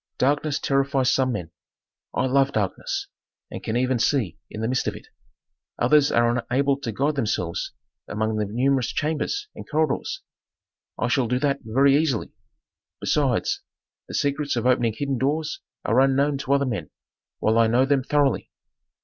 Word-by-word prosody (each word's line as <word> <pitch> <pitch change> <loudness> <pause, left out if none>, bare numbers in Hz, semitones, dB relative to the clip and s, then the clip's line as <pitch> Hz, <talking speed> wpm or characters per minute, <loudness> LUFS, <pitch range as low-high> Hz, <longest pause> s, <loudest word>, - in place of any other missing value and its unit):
Darkness 145 +2 +1
terrifies 135 -1 +1
some 130 -1 +2
men; 90 -7 -5 0.6
I - - 0
love 135 +1 +2
darkness 100 -4 -2 0.5
and - - -6
can 110 - -1
even 130 0 +1
see 110 - 0
in 110 - -6
the 110 - 0
midst 125 +1 0
of - - -1
it. - - -12 0.7
Others 145 +3 +4
are 120 +1 +3
unable 135 +3 +1
to 120 -5 -4
guide 140 +8 0
themselves 105 - -2 0.3
among 110 +1 -1
the 105 - 0
numerous 130 +2 +1
chambers 160 - -2
and - - -10
corridors; 155 -2 -1 0.7
I 125 - 0
shall 125 0 +1
do 125 +2 +1
that 140 -1 +1
very 135 +5 +4
easily. 145 -7 0 0.7
Besides, 135 -6 +1 0.5
the - - -6
secrets 145 0 0
of 120 - -1
opening 120 -3 +2
hidden 140 -3 -1
doors 150 +3 -1 0.3
are 115 - +3
unknown 135 +1 +3
to 140 0 0
other 140 0 +3
men, 105 - -3 0.5
while 110 +1 +2
I 115 - +5
know 120 +4 +3
them 135 -1 +2
thoroughly. 145 0 +1
130 Hz, 160 wpm, -24 LUFS, 115-140 Hz, 0.7 s, I